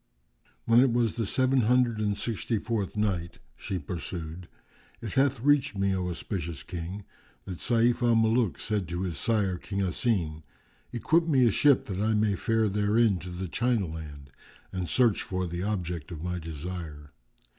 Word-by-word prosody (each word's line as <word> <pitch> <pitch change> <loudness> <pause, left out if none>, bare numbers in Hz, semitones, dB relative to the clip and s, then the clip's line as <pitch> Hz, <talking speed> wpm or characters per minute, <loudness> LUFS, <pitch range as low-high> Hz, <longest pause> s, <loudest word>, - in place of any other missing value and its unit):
When 115 +1 +5
it 130 -1 +5
was 115 -2 +1
the 115 -4 -1
Seven 130 +3 +2
Hundred 120 -1 +3
and 105 -1 0
Sixty 115 +1 -2
fourth 105 -2 -3
Night, 95 -5 -1 0.2
She 95 +9 -4
pursued, 85 +1 -6 0.5
It 110 -3 -6
hath 135 -3 +2
reached 145 -4 +3
me, 100 0 +1
O 90 -1 -2
auspicious 85 -3 -4
King, 90 +4 -6 0.4
that 90 -3 -6
Sayf 120 +1 +2
al 120 -1 +4
Muluk 115 -2 +2
said 105 -5 -2
to 85 +2 -3
his 90 -3 -3
sire 100 -6 +1
King 100 -1 -3
Asim, 90 -5 -1 0.5
"Equip 160 +8 +2
me 135 -6 +4
a 115 - +4
ship 140 +5 +4
that 95 -6 -4
I 110 +1 +2
may 105 -1 +2
fare 110 +2 +1
therein 105 0 +2
to 90 - -8
the 90 +1 -5
China 120 +2 +1
land 75 -4 -8 0.4
and 90 -2 -3
search 120 -5 +3
for 95 -1 -2
the 85 0 -4
object 90 -6 -3
of 80 -2 -7
my 90 0 -2
desire. 80 -2 -7
100 Hz, 170 wpm, -28 LUFS, 90-115 Hz, 0.5 s, When